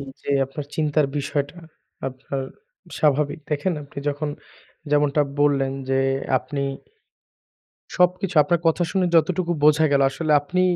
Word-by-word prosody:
এইযে, 140 0 -8 0.2
আপনার 140 +2 -7
চিন্তার 150 -1 +1
বিষয়টা 145 +3 -3 0.5
আপনার 135 +1 -6 0.6
স্বাভাবিক। 150 +1 +1
দেখেন 150 +5 0
আপনি 140 0 -10
যখন 145 +1 -2 0.6
যেমনটা 145 0 +3 0.2
বললেন 140 -2 +2 0.2
যে, 135 0 +2 0.4
আপনি 140 +2 -4 1.3
সবকিছু 180 0 +1
আপনার 165 +3 0
কথা 165 +2 +3
শুনে 190 -2 +1
যতটুকু 170 +2 +2
বোঝা 155 +1 +5
গেলো 140 -1 +4
আসলে 155 +3 -1
আপনি 180 +5 0
150 Hz, 125 wpm, -23 LUFS, 140-165 Hz, 1.3 s, বোঝা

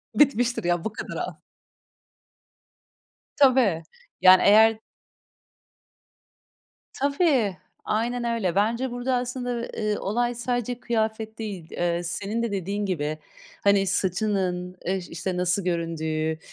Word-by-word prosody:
bitmiştir 245 -6 +3
ya, 175 -1 0
bu 220 - -3
kadar - - -6
al. - - -3 2.0
Tabii, 255 - +4 0.4
yani, 185 0 +8
eğer 220 +2 +6 2.1
Tabii, 280 - +1 0.3
aynen 235 +3 -1
öyle. 230 -7 0
Bence 230 +6 +1
burada 245 +2 -1
aslında, 245 -1 -2
eee, 210 -1 -2
olay 240 +4 -1
sadece 245 0 -2
kıyafet 220 -2 -2
değil, 195 -7 -6
eee, 175 0 -1
senin 200 +6 -3
de 235 - -2
dediğin 200 +2 -2
gibi, 155 -4 -2 0.5
hani, 200 -1 +4
saçının, 185 -2 -1
eee, 190 +2 +1
işte, 180 +2 -3
nasıl 180 +2 +1
göründüğü, 160 -2 -1
210 Hz, 110 wpm, -25 LUFS, 180-240 Hz, 2.1 s, yani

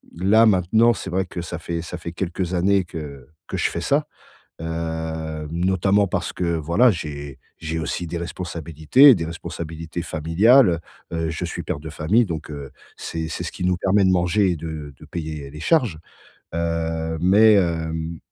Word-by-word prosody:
là, 105 +6 +4
maintenant, 110 +4 +4
c'est 95 - -6
vrai 95 +2 0
que 90 - -6
ça 85 0 -6
fait 85 0 -4
ça 85 +1 -6
fait 85 0 -7
quelques 90 0 -3
années 95 +1 +2
que 70 -6 -8 0.2
que - - -3
je - - +1
fais - - -4
ça, - - +1 0.5
hem, 80 -1 -4
notamment 95 +3 +2
parce - - -2
que 90 - -4
voilà, 85 +11 +3
j'ai 70 -6 -6 0.2
j'ai 80 0 -3
aussi 85 +2 -3
des 85 +1 -4
responsabilités 85 - +3
des 80 - -3
responsabilités 80 0 -6
familiales, 85 - +4 0.3
heu, - - -1
heu, - - -2
je 80 - -3
suis - - -5
père 70 - -3
de 80 - -8
famille, 90 +10 +2
donc 80 -4 -5 0.5
c'est 80 -1 -4
c'est - - -4
ce - - -4
qui - - -6
nous 90 0 +2
permet 95 +2 +2
de 95 - +4
manger 90 +2 +2
et - - -1
de 75 -3 -6
de - - -12
payer 75 -4 -6
les 75 +2 -10
charges. 120 - +2 0.6
Heu 80 -1 -2
mais 105 +4 +6
hem, 80 -3 -1
85 Hz, 175 wpm, -22 LUFS, 80-95 Hz, 0.6 s, mais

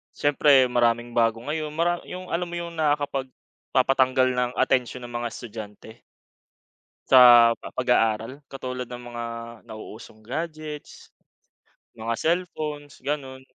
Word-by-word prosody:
siyempre 145 -2 +4
maraming 120 0 +1
bago 115 -1 +1
ngayon, 150 +1 -4
mara 175 +2 +1
yung 185 0 -8
alam 175 +1 -1
mo 175 - -6
yung 170 0 -5
nakakapagpatanggal 135 -2 0
ng 125 -1 0
atensyon 125 0 0
ng 120 - -8
mga 120 0 -3
estudyante? 110 -2 -9 1.1
Sa 120 -2 +8
pa - - -8
pag-aaral? 125 +1 0
Katulad 125 -2 -6
ng 125 0 -8
mga 120 - -4 0.5
nauusong 110 0 -11
gadgets, 155 +2 -7 0.8
mga 115 0 -3
cellphones, 155 -4 -2
gano'n. 130 -1 -5
130 Hz, 115 wpm, -25 LUFS, 120-150 Hz, 1.1 s, Sa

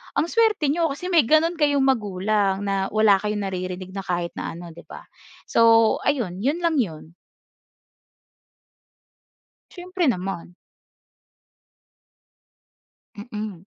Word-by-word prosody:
ang 325 - +1
suwerte 430 -6 +2
niyo 330 +1 +1
kasi 325 +6 -6
may 330 -5 +5
gano'n 325 +4 +3
kayong 285 -2 +2
magulang 205 -4 0
na 195 -1 -1
wala 215 -1 +4
kayong 210 0 -3
naririnig 185 0 -5
na 195 - -4
kahit 175 -2 -3
na - - -5
ano, 170 -1 -10
'di 170 - -12
ba? - - -11 0.4
So 230 -1 +4
ayun 225 -11 0
'yon 295 +6 0
lang 335 -2 +1
'yon. 165 -6 -4 2.5
Siyempre 360 -2 -3
naman. 180 -5 -3 2.6
Mm. 210 -4 -7
215 Hz, 115 wpm, -23 LUFS, 185-295 Hz, 2.6 s, may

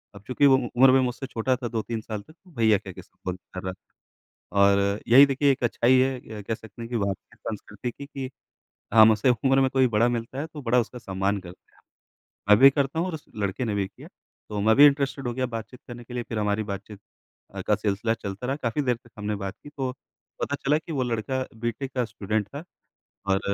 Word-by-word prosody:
अब 100 - -12
चूँकि 130 +3 +2
वो 135 - +7
उम्र 130 +1 +4
मैं 130 - +5
मुझसे 125 +1 -2
छोटा 125 +1 0
था 125 -1 -4
2-3 115 0 -3
साल 110 -1 -5
तक 155 - -18
तो 180 +2 -23
भैया 110 -2 +4
कह - - -9
के - - -10
संबोधित 90 0 -7
कर 90 - -6
रहा 95 0 -3
था। 95 - -25 0.7
और 100 +1 +3
यही 135 +5 +9
देखिए 140 +1 +2
एक 135 - -5
अच्छाई 120 +2 +3
है 125 -5 -1
कह 110 - -2
सकते 110 +1 -11
हैं 115 - -6
कि 120 - -1
भारतीय 100 -2 -4
संस्कृति 105 +3 -6
की 140 +4 -10
कि 135 -2 -6 0.6
हम 110 0 +9
उसे 110 +4 +1
उम्र 135 +3 +3
में 130 - +3
कोई 130 -1 +3
बड़ा 115 +3 +4
मिलता 120 +2 -3
है 150 - -3
तो 155 -2 -10
बड़ा 125 0 +2
उसका 120 +2 -6
सम्मान 100 -1 -1
करते 90 0 -14
हैं। - - -25 0.7
मैं 105 - +8
भी 135 +4 +9
करता 140 +3 -1
हूँ 175 - 0
और 180 - -4
उस 155 - -7
लड़के 100 +4 -2
ने 105 -3 -1
भी 100 -1 0
किया। - - -14 0.4
तो 105 - -3
मैं 110 +2 +4
भी 145 +2 +9
इंटरेस्टेड 140 -2 +2
हो 120 - -2
गया 130 +1 -1
बातचीत 120 +1 -7
करने 120 0 -9
के 120 - -11
लिए। 120 -1 -2
फिर 110 - -2
हमारी 105 +1 0
बातचीत 100 0 -7 0.7
का 105 - +4
सिलसिला 105 +2 0
चलता 100 +1 -6
रहा। 135 +2 -1
काफ़ी 120 +5 0
देर 125 -3 +1
तक 120 0 -22
हमने 105 0 -2
बात 95 - -4
की - - -11
तो 130 -2 -1 0.5
पता 145 - -1
चला 145 +2 +3
कि 165 +1 -8
वो 135 -4 0
लड़का 125 +2 -1
बी.टेक 120 +4 -4
का 125 -2 +1
स्टूडेंट 105 -2 -2
था 145 +6 -8 0.7
और 95 0 +3
120 Hz, 230 wpm, -25 LUFS, 105-130 Hz, 0.7 s, यही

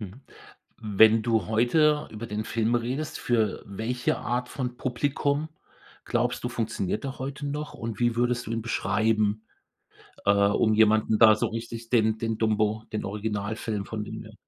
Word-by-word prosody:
Mhm, 105 +5 -9 0.6
wenn 110 +1 +5
du 110 -5 +1
heute 150 +7 +2
über 110 +2 -7
den 105 0 -3
Film 115 +1 0
redest, 130 +6 -2
für 110 -4 0
welche 110 +5 -2
Art 125 0 -2
von 125 -2 -4
Publikum 140 +4 -1 0.6
glaubst 120 0 -1
du, 125 - 0
funktioniert 110 -3 -2
der 135 -1 -5
heute 140 +2 -5
noch? 150 +1 -4
Und 115 -1 -5
wie 120 -1 +2
würdest 120 0 0
du - - -6
ihn 115 - -2
beschreiben, 110 0 0 0.8
äh, 100 - +5
um 100 +2 +3
jemanden 110 0 +4
da 110 -2 +8
so - - 0
richtig 115 0 -6
den 110 -2 +3
den 115 -1 -2
„Dumbo“, 110 0 +1
den 105 - -2
Originalfilm 105 0 -3
von 110 -1 -4
dem - - -7
her - - -13
115 Hz, 160 wpm, -26 LUFS, 110-120 Hz, 0.8 s, da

